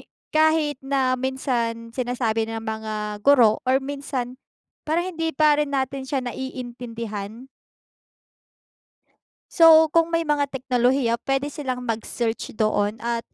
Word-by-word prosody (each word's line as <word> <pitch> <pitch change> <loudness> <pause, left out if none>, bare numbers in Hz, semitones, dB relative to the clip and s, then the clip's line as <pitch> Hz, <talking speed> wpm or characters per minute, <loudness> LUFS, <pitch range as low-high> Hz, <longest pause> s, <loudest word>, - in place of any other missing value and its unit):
hi - - -20 0.2
kahit 310 -2 +2
na 270 -1 0
minsan 245 -3 -2
sinasabi 235 -3 -1
ng 225 - -4
mga 215 -1 -4
guro 245 -5 +5
or 260 - +5
minsan, 270 -3 -5 0.5
parang 345 +4 0
hindi 325 -1 -2
pa 300 -1 +4
rin 285 -1 -1
natin 265 0 -3
siya 265 -2 -1
naiintindihan. 235 -3 -6 2.0
So 320 -2 +7
kung 330 0 +4
may 335 - +1
mga 295 -2 +1
teknolohiya 250 -2 +1
puwede 270 +2 0
silang 260 -5 -4
mag-search 230 0 -3
doon 215 -1 +1
at 235 0 -1
255 Hz, 120 wpm, -23 LUFS, 230-285 Hz, 2.0 s, So